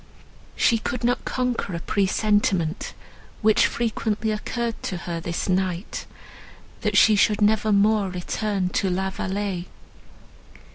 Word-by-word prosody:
She 230 - +3
could 240 +2 -4
not 245 +1 +1
conquer 250 -7 -1
a - - -3
presentiment, 195 -3 0 0.5
which 215 0 +5
frequently 220 -1 -1
occurred 230 +2 -3
to 185 - -3
her, 170 -1 -4
this 170 0 -3
night—that 190 +3 -4
she 220 - +7
should 205 +1 +3
never 215 0 +3
more 205 0 +3
return 185 +1 -2
to 190 +1 0
La 190 +1 -1
Vallée. 190 -2 -3
205 Hz, 115 wpm, -24 LUFS, 185-220 Hz, 0.5 s, she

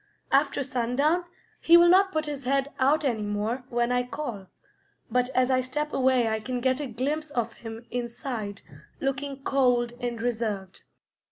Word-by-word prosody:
After 280 0 +2
sundown, 270 +7 +1 0.3
he 340 +1 +7
will 345 0 +7
not 380 +2 +5
put 310 -2 -1
his 290 -2 -5
head 275 +2 +1
out 290 +4 +3
any 235 -5 0
more 210 +5 -2
when 240 0 0
I 250 0 +2
call, 245 -6 -5 0.6
but 250 0 +2
as 255 0 +3
I 255 0 +3
step 295 +4 -3
away 260 -3 +3
I 220 0 0
can 250 +3 -3
get 260 +2 +1
a 290 - -3
glimpse 285 +6 -2
of 235 -4 -2
him 225 0 -9
inside 235 -4 -4 0.4
looking 275 0 -3
cold 245 -4 +2
and 240 -1 -3
reserved. 220 -5 -3
255 Hz, 165 wpm, -27 LUFS, 235-280 Hz, 0.6 s, he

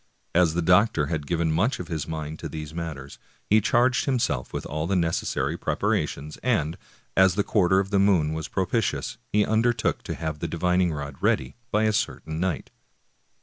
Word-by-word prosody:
As 85 -2 +3
the 85 - +1
doc 95 +6 +5
tor 75 - +1
had 75 -2 -3
given 85 -2 +1
much 95 +12 +1
of 90 - -5
his 80 -3 -3
mind 80 -1 -5
to - - -5
these 75 -1 -7
matters 80 -5 -6 0.3
he 110 +1 +4
charged 120 +4 +2
himself 130 -4 0
with - - -4
all 80 +1 -3
the 100 - +1
necessary 85 -2 0
preparations, 75 +2 -1
and, 95 -11 0 0.4
as 95 -1 +5
the 100 - +2
quar 95 -5 +2
ter 95 +1 +5
of 95 0 -2
the 100 - +3
moon 90 -6 +3
was 80 -1 -4
propitious, - - -1
he 105 0 +3
undertook 115 +1 +1
to - - -5
have 80 -2 -4
the - - -2
divining 90 +1 +1
rod 70 -2 -5
ready 65 0 +1 0.2
by 105 0 +2
a 110 0 +2
certain 80 -5 -2
night. 90 -3 -2
85 Hz, 190 wpm, -25 LUFS, 80-100 Hz, 0.4 s, doc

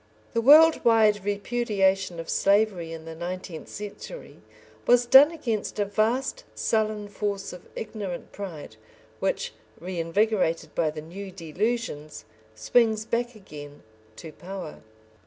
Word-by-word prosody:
The 230 - +1
world 310 +6 +7
wide 215 -3 +4
repudiation 200 -4 0
of 165 - -6
slavery 200 -4 +2
in 165 -1 -8
the 165 - -7
nineteenth 175 0 -6
century 210 - -8 0.5
was 245 0 +5
done 270 +4 +8
against 240 -13 -3
a 205 - +1
vast 230 - 0
sullen 215 -2 0
force 205 -2 -3
of 180 - -12
ignorant 205 -5 -6
pride, 165 - -8 0.4
which, - - -1 0.3
reinvigorated 170 -1 0
by 160 -2 +1
the 155 0 -7
new 190 +5 -8
delusions, 175 - -3 0.3
swings 220 - +2
back 240 +1 -2
again 145 -8 -11 0.3
to 160 +7 -9
power. 180 -1 -8
200 Hz, 120 wpm, -26 LUFS, 170-225 Hz, 0.5 s, done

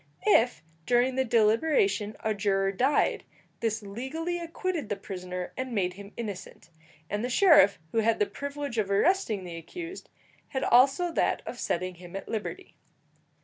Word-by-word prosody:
If 245 - +4 0.2
during 245 +1 +3
the 265 +1 +1
deliberation 220 -3 +2
a 220 -1 0
juror 195 -1 +1
died, 255 +9 +1 0.4
this 220 -1 -1
legally 280 - -4
acquitted 335 - -3
the 205 - 0
prisoner 180 -2 -6
and 260 -1 -4
made 180 -3 0
him 200 +2 -11
innocent, 200 -6 -7 0.4
and 205 +4 -2
the 250 - -1
sheriff, 255 - +6
who 225 - +1
had 225 0 +2
the 210 - +2
privilege 280 -1 -4
of 200 -2 0
arresting 215 - +2
the 175 -2 -7
accused, 340 - -8 0.4
had 265 - -3
also 275 +8 +4
that - - 0
of - - -7
setting 185 0 -2
him 175 0 -10
at 195 - -6
liberty. 230 - -5
225 Hz, 155 wpm, -28 LUFS, 200-280 Hz, 0.4 s, sheriff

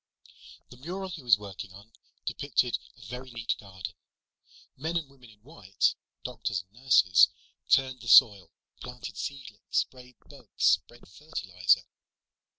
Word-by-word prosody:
The 125 - -12
mural 185 +8 -5
he 165 -4 -7
was 120 -5 +5
working 100 -1 -9
on 100 +3 -15 0.3
depicted - - 0 0.2
a - - -17
very 125 +4 -8
neat 115 -2 -2
garden. 95 -3 -8 0.8
Men 160 +5 -2
and 160 -4 -3
women 135 -3 -18
in 105 -1 -20
white, 115 - 0 0.3
doctors 95 -5 -3
and 95 - -42
nurses, 95 -8 +6 0.4
turned 130 -1 +3
the 120 - -10
soil, 100 -6 +7 0.3
planted 125 -3 -8
seedlings, 125 -4 -7
sprayed 125 -1 -2
bugs, 135 -7 -16
spread 120 - +2
fertilizer. 95 - 0
120 Hz, 135 wpm, -28 LUFS, 100-135 Hz, 0.8 s, soil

